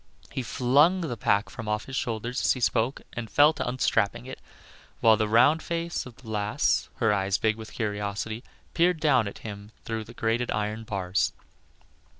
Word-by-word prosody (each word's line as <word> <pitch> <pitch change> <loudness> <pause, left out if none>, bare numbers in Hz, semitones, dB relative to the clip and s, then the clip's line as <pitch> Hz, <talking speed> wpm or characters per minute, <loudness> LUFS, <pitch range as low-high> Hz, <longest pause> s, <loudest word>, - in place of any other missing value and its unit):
He - - -3
flung 145 +10 +3
the 150 -8 -3
pack 100 -1 +1
from 115 - -7
off 105 0 -1
his 135 - -7
shoulders 120 +1 -2
as - - +3
he 130 - -6
spoke 120 +1 +1
and 115 -2 -5
fell 145 +5 +5
to 140 - -3
unstrapping 115 -3 0
it, 130 - -8 0.6
while 110 -1 +6
the 110 0 0
round 130 +9 +5
face 170 -3 -3
of 120 - -12
the 120 - -17
lass 105 +5 0
(her 110 -3 +2
eyes 95 -1 +1
big 110 +3 +1
with 110 0 -10
curiosity) 105 +1 -3 0.3
peered 175 0 +3
down 130 -8 +3
at 100 - -7
him 100 0 -8
through 110 -1 -3
the - - -13
grated 115 +2 0
iron 105 +2 -2
bars. 90 - -1
115 Hz, 180 wpm, -27 LUFS, 105-130 Hz, 0.6 s, while